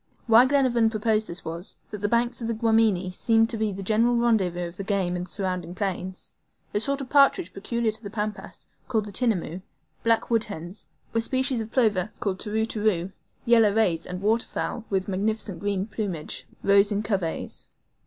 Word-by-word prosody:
Why 235 Hz, +2 st, +7 dB
Glenarvan 255 Hz, -5 st, +3 dB
proposed 215 Hz, 0 st, 0 dB
this 170 Hz, -, -5 dB
was, 165 Hz, +3 st, -5 dB, 0.2 s
that 210 Hz, -, -5 dB
the 205 Hz, -, 0 dB
banks 235 Hz, +1 st, +1 dB
of 230 Hz, -, -2 dB
the 230 Hz, -, -1 dB
Guamini 220 Hz, -5 st, +2 dB
seemed 225 Hz, +4 st, +2 dB
to 230 Hz, -, -1 dB
be 215 Hz, -1 st, 0 dB
the 195 Hz, 0 st, -6 dB
general 225 Hz, +4 st, +3 dB
rendezvous 190 Hz, -7 st, +1 dB
of -, -, -13 dB
all -, -, -19 dB
the 195 Hz, -, -4 dB
game 190 Hz, -3 st, 0 dB
in 180 Hz, 0 st, -3 dB
the -, -, -15 dB
surrounding 185 Hz, -3 st, -2 dB
plains. 185 Hz, -1 st, -3 dB, 0.4 s
A 205 Hz, -, +2 dB
sort 275 Hz, +5 st, +1 dB
of 260 Hz, -, -7 dB
partridge 275 Hz, -, +4 dB
peculiar 230 Hz, +3 st, -1 dB
to 220 Hz, +1 st, -4 dB
the 205 Hz, -, -7 dB
Pampas, 210 Hz, 0 st, -5 dB, 0.2 s
called 215 Hz, -4 st, -1 dB
TINAMOUS; 190 Hz, -8 st, 0 dB, 0.4 s
black 230 Hz, 0 st, +1 dB
wood 230 Hz, -1 st, +3 dB
hens; 175 Hz, -2 st, -7 dB, 0.3 s
a 230 Hz, -, +2 dB
species 260 Hz, +1 st, 0 dB
of 220 Hz, -, -6 dB
plover, 210 Hz, -5 st, +2 dB
called 190 Hz, -2 st, -2 dB
TERU 220 Hz, +1 st, -1 dB
TERU; 210 Hz, -5 st, 0 dB, 0.3 s
yellow 225 Hz, -3 st, +5 dB
rays, 180 Hz, -7 st, +1 dB
and 180 Hz, +1 st, -6 dB
waterfowl 225 Hz, +1 st, -1 dB
with 190 Hz, -1 st, 0 dB
magnificent 205 Hz, 0 st, -1 dB
green 200 Hz, -1 st, -1 dB
plumage, 195 Hz, -8 st, -4 dB, 0.2 s
rose 200 Hz, +1 st, +5 dB
in 205 Hz, +1 st, 0 dB
coveys. 195 Hz, -6 st, -2 dB
210 Hz, 185 wpm, -25 LUFS, 190-230 Hz, 0.4 s, Why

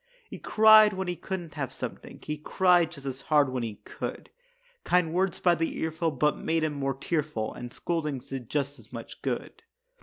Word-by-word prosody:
He -, -, -7 dB
cried 215 Hz, -1 st, +7 dB
when 190 Hz, 0 st, -3 dB
he 180 Hz, -, -1 dB
couldn't 175 Hz, -3 st, -5 dB
have 140 Hz, -4 st, -3 dB
something; -, -, -7 dB
He 150 Hz, -, -3 dB
cried 175 Hz, +2 st, +3 dB
just 140 Hz, -5 st, -10 dB
as 135 Hz, 0 st, -4 dB
hard 145 Hz, -3 st, +3 dB
when 130 Hz, -1 st, -2 dB
he 110 Hz, -3 st, -4 dB
could; -, -, -6 dB, 0.5 s
Kind 180 Hz, -3 st, +2 dB
words 185 Hz, +1 st, +1 dB
by 175 Hz, -, +4 dB
the 165 Hz, -1 st, -1 dB
earful 160 Hz, +1 st, -1 dB
but 150 Hz, 0 st, +1 dB
made 165 Hz, 0 st, 0 dB
him 155 Hz, -1 st, 0 dB
more 135 Hz, -2 st, -2 dB
tearful, 145 Hz, -6 st, -2 dB
And 120 Hz, 0 st, -8 dB
scoldings 150 Hz, -6 st, -3 dB
did 130 Hz, -4 st, -6 dB
just 140 Hz, -2 st, -2 dB
as 110 Hz, -, -18 dB
much 115 Hz, -2 st, -9 dB
good. -, -, -4 dB
155 Hz, 190 wpm, -28 LUFS, 135-175 Hz, 0.5 s, cried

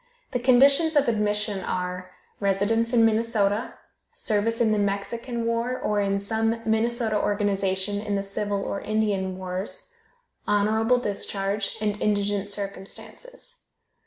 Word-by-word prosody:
The 250 Hz, -, 0 dB
conditions 275 Hz, +6 st, +5 dB
of 285 Hz, -2 st, +4 dB
admission 210 Hz, -3 st, 0 dB
are: 180 Hz, 0 st, -3 dB, 0.3 s
Residence 205 Hz, +4 st, +1 dB
in 230 Hz, -2 st, +5 dB
Minnesota, 220 Hz, -1 st, +1 dB, 0.4 s
service 225 Hz, +2 st, 0 dB
in 225 Hz, -2 st, +3 dB
the 215 Hz, -, +2 dB
Mexican 230 Hz, +4 st, -2 dB
War, 230 Hz, +2 st, 0 dB
or 210 Hz, -1 st, 0 dB
in 200 Hz, 0 st, +1 dB
some 225 Hz, +3 st, 0 dB
Minnesota 225 Hz, 0 st, +1 dB
organization 200 Hz, -1 st, 0 dB
in 210 Hz, -1 st, -2 dB
the 195 Hz, -, -1 dB
Civil 200 Hz, 0 st, -2 dB
or 200 Hz, -, -3 dB
Indian 205 Hz, -4 st, 0 dB
Wars, 185 Hz, -, -4 dB, 0.5 s
honorable 220 Hz, +4 st, +3 dB
discharge, 200 Hz, -2 st, -2 dB
and 210 Hz, -1 st, -1 dB
indigent 205 Hz, -1 st, 0 dB
circumstances. 210 Hz, -, -6 dB
210 Hz, 125 wpm, -25 LUFS, 200-230 Hz, 0.5 s, conditions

